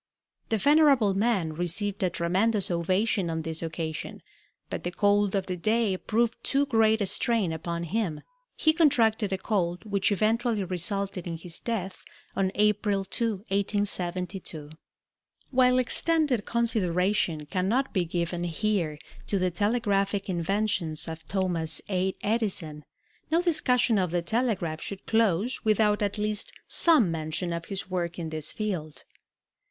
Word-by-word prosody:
The 225 - +1
venerable 280 -4 +4
man 195 -6 +1
received 190 +5 -1
a 185 - +2
tremendous 190 +5 +1
ovation 185 +2 0
on 160 0 -3
this 160 0 -3
occasion, 160 -1 -5 0.4
but - - -5
the 175 - -1
cold 205 +2 +2
of 195 - 0
the 180 - -3
day 215 +2 +1
proved 225 +4 -1
too 280 +1 +1
great 220 -4 +3
a - - +2
strain 215 -3 +1
upon 170 +1 -4
him. 170 -3 -2 0.3
He 315 - +3
contracted 230 - +3
a 190 - 0
cold 175 -4 -1
which 200 -1 0
eventually 220 +1 +1
resulted 185 +1 -3
in 165 -1 -4
his 170 0 -6
death 195 -5 -4 0.3
on 190 -1 +1
April 205 -1 +1
2, 230 +4 -1 0.2
1872. 185 -5 -2 0.8
While 255 -1 +4
extended 265 -2 +1
consideration 190 -7 +1
cannot 205 - 0
be 185 - +2
given 175 +1 -2
here 170 -3 -1 0.3
to 200 - +1
the 185 -1 0
telegraphic 200 0 0
inventions 180 -3 -1
of 160 0 -8
Thomas 180 -5 +1
A. 190 0 0
Edison, 190 -9 -1 0.4
no 325 +2 +3
discussion 250 - +2
of 180 -2 0
the 175 0 -1
telegraph 185 -6 -1
should 200 - -7
close 225 +1 +1
without 215 -1 +2
at 205 0 -1
least 210 0 0
some 300 - +5
mention 160 +2 -3
of 170 0 -4
his 195 0 -4
work 175 -2 -2
in 165 -2 -4
this 155 -1 -1
field. 180 -8 -4
195 Hz, 140 wpm, -27 LUFS, 170-220 Hz, 0.8 s, some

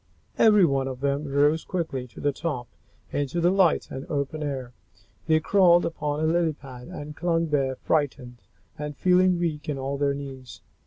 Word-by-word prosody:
Every 210 -4 +6
one 135 -3 0
of 130 -1 -6
them 140 +1 0
rose 145 +3 +2
quickly 155 -8 -3
to 115 - -14
the 145 - +1
top, 140 -5 -4 0.4
into 145 +4 -1
the 175 +1 +3
light 190 -4 +2
and 130 - -5
the 150 - -11
open 145 -1 -3
air. 135 -4 -4 0.5
They 160 -1 +4
crawled 175 0 +4
upon 150 -2 -2
a - - 0
lily 165 0 +2
pad 130 -4 -11
and 150 0 -8
clung 165 -1 0
there, 135 -3 +1
frightened, 130 -5 -2 0.4
and 150 -1 -5
feeling 185 0 +4
weak 155 -3 -2
in 145 - -2
all 135 +1 -3
their 140 -1 +1
knees. 135 -3 -9
145 Hz, 180 wpm, -25 LUFS, 135-165 Hz, 0.5 s, Every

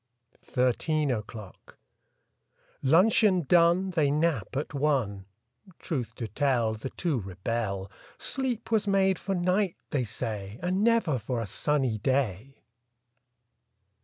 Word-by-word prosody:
THIRTEEN 140 +4 +1
O'CLOCK 105 -3 -7 1.1
L 130 - +1
uncheon 190 -1 +4
done, 175 +3 +4
^ - - -15
They 155 -4 +2
nap 150 - 0
at 145 - -3
one; 130 -10 0 0.5
Truth 130 -8 -4
to 115 - -4
tell, 120 -1 +1
The 110 +5 -6
two 160 -5 -1
rebel. 100 +1 -3 0.3
Sleep 245 -4 -2
was 215 -2 +2
made 195 -2 +2
for 195 - -2
night, 180 +1 +1 0.2
they 140 -4 +1
say. 110 -2 -5
And 185 +3 0
never 225 - +2
for 120 +2 -3
a 115 - -2
sunny 130 +2 0
day! 130 0 -1
140 Hz, 125 wpm, -28 LUFS, 110-180 Hz, 1.1 s, uncheon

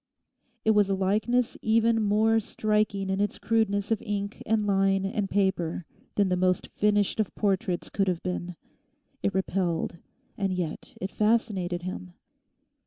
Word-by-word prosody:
It 220 - +5
was 205 -2 +4
a 195 - +2
likeness 220 +6 +1
even 225 +1 +3
more 215 +2 +3
striking 210 -2 0
in 190 +1 0
its 205 - -1
crudeness 210 -2 0
of 220 - +1
ink 205 -1 -4
and 220 -1 +2
line 195 -1 +2
and 195 0 -2
paper 190 -4 0 0.3
than 200 -2 +3
the 180 - +2
most 185 0 +1
finished 205 0 +1
of 215 - -1
portraits 190 -3 -1
could 195 -1 0
have 180 -2 -1
been. 180 -1 -3 0.7
It 200 - -1
repelled, 180 -3 -1 0.4
and 195 -1 0
yet 175 -4 -5
it 190 - -4
fascinated 205 -5 0
him. 90 - -6
200 Hz, 150 wpm, -27 LUFS, 185-215 Hz, 0.7 s, It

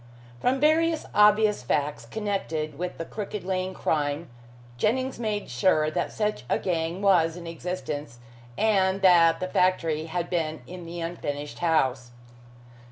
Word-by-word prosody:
From 260 - +1
various 320 +2 +3
obvious 210 0 +5
facts 145 +4 -1
connected 180 -8 -3
with 180 0 -4
the 165 - -4
Crooked 210 0 -5
Lane 185 0 -2
crime, 150 0 -1 0.4
Jennings 255 - 0
made 215 -3 -2
sure 155 +5 +2
that 175 +1 -2
such 210 - -2
a - - +2
gang 170 +1 -2
was 170 -4 +4
in 175 - -9
existence, 165 -6 -5 0.4
and 195 -3 +2
that 170 -3 +6
the 185 - -2
factory 165 -4 +1
had 175 +1 -2
been 160 -3 -2
in 180 -1 -9
the 170 0 -6
unfinished 150 -4 -5
house. 130 -7 +1
175 Hz, 140 wpm, -26 LUFS, 155-205 Hz, 0.4 s, that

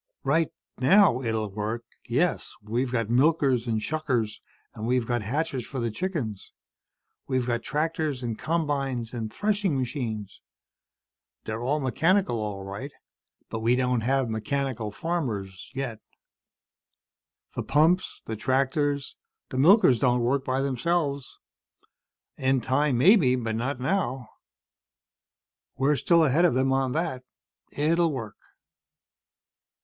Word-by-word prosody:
"Right 155 +4 +2 0.3
now, 135 - +5
it'll 110 -4 -2
work. 110 +3 -3 0.3
Yes, - - 0
we've 120 +4 -1
got 115 -3 -1
milkers 130 -2 +3
and 110 -2 0
shuckers, 125 -5 -1 0.3
and 110 +1 -5
we've 125 -1 +1
got 120 0 -1
hatchers 135 +4 -2
for 135 - -6
the 115 -1 -1
chickens. 120 - -4 0.7
We've 130 -2 0
got 120 -1 -1
tractors 150 -1 -2
and 115 -2 -2
combines 140 -6 -2
and 110 -3 -4
threshing 205 -7 0
machines. 115 -6 -4 1.0
They're 110 +1 -4
all 140 +5 0
mechanical, 160 - +1
all 105 -2 -4
right. 100 +9 -6 0.6
But 115 - -3
we 115 +2 +3
don't 125 -2 +1
have 135 +2 +1
mechanical 115 0 -2
farmers, 105 - -3
yet. 130 -5 -3 1.6
The - - -1
pumps, 160 +6 +2
the 110 - -4
tractors, 140 +4 0 0.3
the 130 - -5
milkers 150 - +6
don't 125 -2 +2
work 130 +3 +1
by 130 0 0
themselves. 140 +1 -1 1.0
In 130 0 +2
time, 130 +2 +1
maybe. 150 - +5
Not 120 +3 -2
now. 135 - -1 1.5
We're 140 +3 +3
still 170 +3 +4
ahead 150 +5 +3
of 165 - +3
them 135 +1 +2
on 135 -1 +1
that. 155 -6 -2 0.5
It'll 165 +3 +2
work." 115 -7 -6
130 Hz, 125 wpm, -26 LUFS, 115-150 Hz, 1.6 s, milkers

